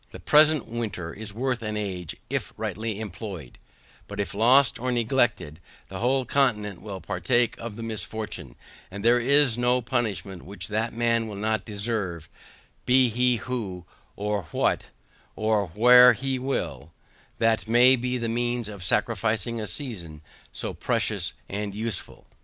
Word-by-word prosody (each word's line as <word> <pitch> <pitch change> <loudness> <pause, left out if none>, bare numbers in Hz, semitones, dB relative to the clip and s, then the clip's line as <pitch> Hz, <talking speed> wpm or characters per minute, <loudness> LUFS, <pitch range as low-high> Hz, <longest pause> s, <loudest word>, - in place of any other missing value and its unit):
The - - -10
present 155 -2 +5
winter 110 -8 -4
is 105 0 -7
worth 125 +2 -2
an 105 -1 -3
age 95 -5 -4
if - - -3
rightly 110 -1 -3
employed, 95 - -7 0.5
but - - -8
if 100 - -2
lost 120 +4 +4
or 125 +2 -1
neglected, 120 - 0 0.3
the - - -6
whole 130 +2 +1
continent 105 - +1
will 100 -2 -6
partake 120 +5 0
of 115 -2 -6
the 115 - -7
misfortune; 110 - -5 0.3
and 100 +3 -7
there 120 +1 +5
is 135 -1 +4
no 125 +1 +3
punishment 110 -7 -2
which 90 -2 -8
that 110 +2 -1
man 115 -1 +1
will 105 - -7
not 110 0 -1
deserve, 100 -6 -3 0.6
be 130 0 +5
he 125 +2 +2
who, 105 -7 -5 0.3
or 105 -2 -2
what, 75 - 0 0.5
or 110 -2 +1
where 125 +2 +8
he 130 +3 -2
will, 80 - -3 0.5
that 115 -1 +1
may 120 +3 +6
be 125 0 -2
the 115 -1 -2
means 120 0 -1
of 100 -3 -8
sacrificing 115 +5 0
a 105 - -4
season 85 - -5 0.3
so - - -4
precious - - -1
and 100 0 -4
useful. 110 0 -4
110 Hz, 150 wpm, -26 LUFS, 100-120 Hz, 0.6 s, where